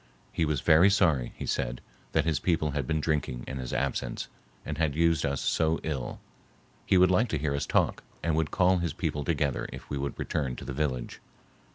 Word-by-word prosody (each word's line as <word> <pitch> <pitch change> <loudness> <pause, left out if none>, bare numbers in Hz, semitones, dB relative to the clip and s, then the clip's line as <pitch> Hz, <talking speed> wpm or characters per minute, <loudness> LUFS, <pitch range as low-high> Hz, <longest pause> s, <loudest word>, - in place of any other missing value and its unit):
He 80 - +1
was 75 -3 0
very 85 +4 +6
sorry, 80 -11 +2
he - - -5
said, - - -1 0.3
that - - +2
his 80 -3 +1
people 80 -4 +1
had 70 -3 -2
been 80 -1 +1
drinking 70 -6 -1
in 65 - -5
his 65 -1 -5
absence - - -2 0.4
and 75 0 -4
had 80 -3 +1
used 85 -2 +3
us 70 -1 -2
so 80 0 +1
ill; 70 -6 -3 0.7
he 95 - +5
would 90 0 +6
like 110 +6 +3
to 75 - 0
hear 75 0 -1
us 70 0 -2
talk - - +1 0.2
and 85 -1 +1
would 80 -1 +1
call 90 -1 +3
his 85 -1 -1
people 75 - -2
together 70 -3 -1
if - - -9
we 70 - -1
would 70 +1 -3
return 70 -6 -2
to - - -9
the 70 - -4
village. 65 -4 -2
75 Hz, 210 wpm, -28 LUFS, 70-80 Hz, 0.7 s, very